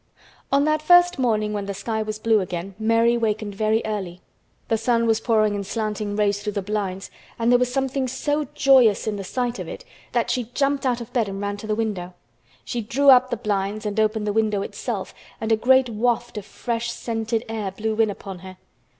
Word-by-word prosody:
On 280 +1 +4
that 310 0 +1
first 355 0 +5
morning 215 -4 +1
when 200 -1 -3
the 200 - -4
sky 220 +2 -2
was 215 0 -4
blue 220 0 +3
again 180 0 -4
Mary 230 +2 +3
wakened 215 -2 -1
very 215 +2 +1
early. 190 -5 -4 0.5
The 225 - +2
sun 230 0 +2
was 225 -1 +2
pouring 215 -3 +2
in 200 -1 -3
slanting 210 0 -3
rays 205 -1 +1
through 210 0 -3
the 200 - -2
blinds 195 -2 -3 0.3
and 230 0 +2
there 245 - +5
was 250 0 +1
something 265 0 -1
so 290 +4 -1
joyous 260 -8 +5
in 215 -2 -2
the 195 - -5
sight 245 +4 -2
of - - -5
it - - -8 0.3
that - - +1
she 250 -3 -1
jumped 275 -1 +1
out 245 -1 0
of 230 - -10
bed 230 -5 +1
and 195 0 -5
ran 205 0 -3
to 215 - -8
the 215 - 0
window. 195 -5 -3 0.5
She 240 - -3
drew 275 +6 +4
up 255 0 +6
the 240 - -2
blinds 205 0 -2
and 210 +1 -1
opened 215 0 +1
the 205 - -1
window 215 -2 +1
itself - - -5 0.3
and 225 0 -2
a - - +6
great 260 +3 +4
waft 240 +1 -1
of 210 -1 -6
fresh, 235 0 -3
scented 225 -1 -3
air 220 -3 -3
blew 215 +3 -3
in 225 -1 +3
upon 195 -2 -7
her. 185 0 -11
220 Hz, 215 wpm, -23 LUFS, 205-240 Hz, 0.5 s, up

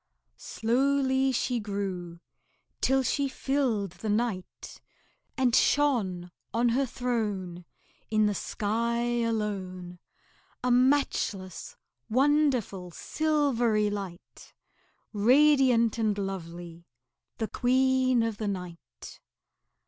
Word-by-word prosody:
Slowly 265 +3 +1
she 245 -1 -1
grew 190 -5 -5 0.6
till 265 0 +2
she 280 +2 0
filled 260 -8 -1
the 185 +5 -6
night, 210 -3 -3 0.6
And 255 -3 +2
shone 200 -12 +1 0.2
On 240 +1 +3
her 265 +3 +1
throne 205 -8 -3 0.4
In 215 -1 +3
the 210 - +1
sky 235 +4 -1
alone, 190 -6 -3 0.6
A 250 - +1
matchless, 245 - 0 0.3
wonderful, 255 -8 +1
silvery 240 - 0
light, 195 -3 -8 0.6
Radiant 245 0 +4
and 215 -2 +1
lovely, 175 -3 -6 0.5
the 220 - -2
Queen 255 0 +2
of 225 -2 -2
the 215 - -3
night. 180 -4 -8
225 Hz, 90 wpm, -28 LUFS, 195-260 Hz, 0.6 s, Radiant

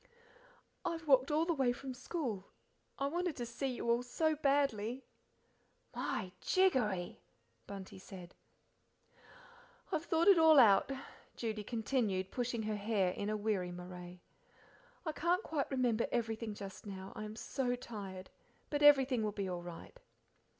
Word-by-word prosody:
"I've 330 -1 -3
walked 265 -2 +5
all 310 +2 +2
the 340 - +1
way 265 -5 +2
from 260 +2 -6
school. 250 - -4 0.5
I 275 - -1
wanted 345 +2 -1
to 240 - -4
see 240 +4 -3
you 250 -2 -3
all 235 +1 +3
so 310 +6 0
badly." 275 -5 +1 0.9
"My 185 - -2
jiggery!" 245 - +2 0.5
Bunty 195 -1 -8
said. 185 -2 -10 1.6
"I've 325 -2 -1
thought 330 +2 +2
it 390 -4 +8
all 320 -1 +7
out," 215 -1 +6 0.4
Judy 220 -2 -3
continued, 220 -4 -1
pushing 245 -2 -1
back 215 - -3
her 215 - 0
hair 200 -3 +1
in 205 +3 -3
a 215 - 0
weary 205 -4 -1
moray. 180 0 -9 0.8
"I 315 - 0
can't 345 +5 +1
quite 300 -3 -2
remember 245 -4 +1
everything 225 -2 -2
just 200 +1 -8
now, 190 -1 -7
I - - -5
am 215 0 -6
so 250 +1 -1
tired, 200 -6 -8 0.4
but 290 -1 0
everything 270 -4 +6
will 215 -1 0
be 200 -2 -2
all 180 -1 -3
right." 175 - -10
235 Hz, 150 wpm, -35 LUFS, 200-280 Hz, 1.6 s, it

